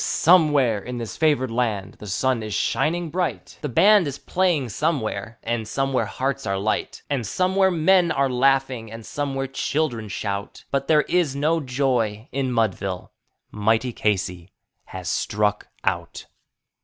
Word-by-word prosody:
somewhere 150 - +4
in 120 +5 -6
this 115 -6 -5
favored 145 -6 +2
land 110 -5 -1
the 105 - -9
sun 115 +5 0
is 110 -2 -4
shining 170 0 0
bright; 180 0 -3
The 150 - -3
band 195 - +5
is 140 - -4
playing 175 -9 0
somewhere, 115 -6 -2
and 115 -1 -2
somewhere 135 +2 0
hearts 135 +1 -2
are 95 0 0
light. 105 +3 -2
And 140 -4 -1
somewhere 190 - +2
men 175 +1 +3
are 140 0 +2
laughing, 130 -3 +1
and 115 0 -9
somewhere 135 -2 -2
children 135 -3 -2
shout; 100 0 -4
But 135 0 -1
there 150 -2 +4
is 170 -7 +1
no 155 +4 +1
joy 125 -5 -1
in 135 -2 -1
Mudville 100 -5 -1 0.4
mighty 110 +4 +1
Casey 95 -5 -1 0.4
has 90 -2 -8
Struck 105 +4 0 0.2
Out. - - -2
130 Hz, 145 wpm, -23 LUFS, 110-150 Hz, 0.4 s, band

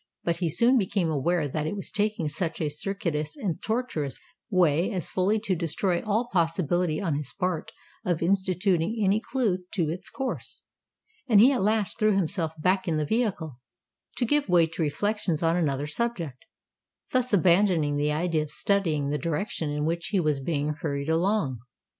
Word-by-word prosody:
But 170 -1 0
he 170 -1 0
soon 240 - +4
became 185 -4 0
aware 155 +2 +1
that 150 +2 -2
it 180 - -2
was 195 - -5
taking 210 -6 0
such 160 +2 -3
a 155 - 0
circuitous 160 - -3
and 195 - -3
tortuous 220 - -2 0.3
way 180 0 +3
as 185 -6 -3
fully 195 +4 +2
to 200 -4 0
destroy 170 +2 -1
all 220 +3 0
possibility 170 -1 +1
on 170 -6 -1
his 140 -2 -3
part 180 -4 -1 0.3
of 175 -2 0
instituting 185 +1 +1
any 200 0 +3
clue 230 -9 0 0.2
to 170 -6 +1
its 175 +4 -5
course; 265 -2 -5 0.7
and 215 -4 +7
he 245 +6 +8
at 260 - 0
last 210 0 +1
threw 215 -1 +3
himself 165 -4 -1
back 185 +4 +1
in 160 -2 +1
the 155 - 0
vehicle, 175 - -1 0.6
to 245 - +1
give 290 -2 +1
way 175 -2 +5
to 165 +1 -6
reflections 170 +2 -1
on 165 +1 +3
another 145 -5 0
subject—thus 220 - -5
abandoning 175 -5 +3
the 145 +1 +1
idea 160 +1 0
of 150 - -5
studying 160 -8 +1
the 150 - -1
direction 160 +1 -2
in 150 0 -1
which 170 +1 -1
he 200 - +1
was 150 -4 +1
being 145 +1 -1
hurried 140 -1 -2
along. 165 - +1
175 Hz, 170 wpm, -27 LUFS, 155-205 Hz, 0.7 s, he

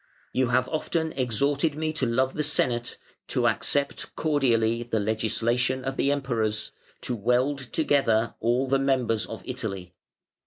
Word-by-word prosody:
"You 130 -1 +2
have 125 +1 +2
often 160 0 -1
exhorted 140 +5 0
me 155 0 -2
to 135 -5 0
love 130 +3 +1
the 150 - -2
Senate, 120 -5 +1 0.3
to - - +1
accept 140 0 0
cordially 120 -7 +2
the 120 -2 -1
legislation 120 +4 0
of 135 0 -2
the 140 - +1
Emperors, 115 -7 -1 0.3
to 125 - -2
weld 125 +6 +1
together 120 -8 +2
all 120 +4 +1
the 135 +1 +2
members 125 -5 +1
of 110 - -8
Italy. 100 -8 -4
125 Hz, 145 wpm, -26 LUFS, 115-140 Hz, 0.3 s, You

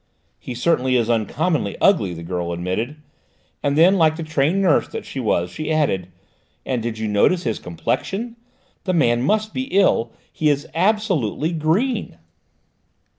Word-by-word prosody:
"He 125 - -7
certainly 130 -1 +1
is 120 -1 +2
uncommonly 120 - 0
ugly," 160 - +3
the 85 - -8
girl 85 0 -3
admitted, 95 - -3 0.7
and 145 0 0
then 180 +4 +5
like 160 -1 +4
the 165 - -5
trained 155 +4 +1
nurse 185 -6 +3
that - - -7
she 135 - -6
was, 90 -7 0
she 155 - -4
added, 140 - +1 0.6
"and 125 -3 -1
did 115 -1 -4
you 110 0 -2
notice 105 - +2
his 115 -4 -2
complexion? 195 - -3 0.5
The 185 - 0
man 120 -8 +3
must 215 +9 0
be 260 - -2
ill: 190 - +2 0.2
he 155 - +1
is 145 0 0
absolutely 175 - +1
green!" 180 - 0
150 Hz, 155 wpm, -21 LUFS, 110-180 Hz, 0.7 s, then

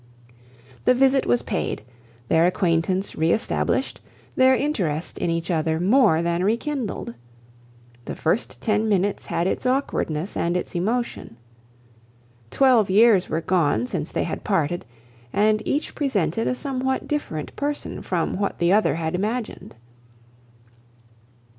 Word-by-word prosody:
The 250 - +5
visit 270 +1 +3
was 245 - +2
paid, 200 - -3 0.4
their 165 +5 +4
acquaintance 180 +1 0
re 160 +1 +1
established, 225 - 0 0.3
their 260 0 +5
interest 180 - -2
in - - -1
each 165 +1 -2
other 160 -1 0
more 195 -3 +4
than 170 +1 0
re 215 +4 +2
kindled. 255 - -4 0.9
The - - -5
first 165 +8 -1
ten 215 0 +1
minutes 200 0 0
had 170 - -1
its 190 - -1
awkwardness 200 - -1
and 175 +1 0
its 180 - -5
emotion. 210 - -2 1.1
Twelve 250 - +4
years 205 -1 +5
were 160 - -1
gone 155 - +1
since - - -4
they - - -1
had - - -5
parted, 165 +3 0 0.5
and 215 +4 +2
each 290 - -1
presented 225 - 0
a 255 - 0
somewhat 265 -1 -2
different 165 - -4
person 290 +1 -3
from 175 -2 -2
what 200 - -1
the 175 +2 +2
other 210 -8 +3
had 160 -1 -2
imagined. 215 - -3
195 Hz, 135 wpm, -23 LUFS, 165-250 Hz, 1.1 s, The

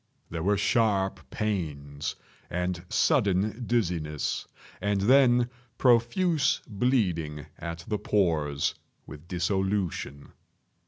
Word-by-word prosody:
There 80 0 -3
were 100 +4 +2
sharp 100 -2 +1
pains, 75 -9 -3 0.3
and 90 0 -2
sudden 110 - +2
dizziness, 85 - -1 0.3
and 100 0 +1
then 125 +1 +5 0.3
profuse 135 +7 +3
bleeding 90 - 0
at 85 0 -6
the 105 -3 -1
pores, 80 -9 +1 0.3
with 75 +2 -11
dissolution. 90 -5 -2
95 Hz, 90 wpm, -28 LUFS, 80-115 Hz, 0.3 s, then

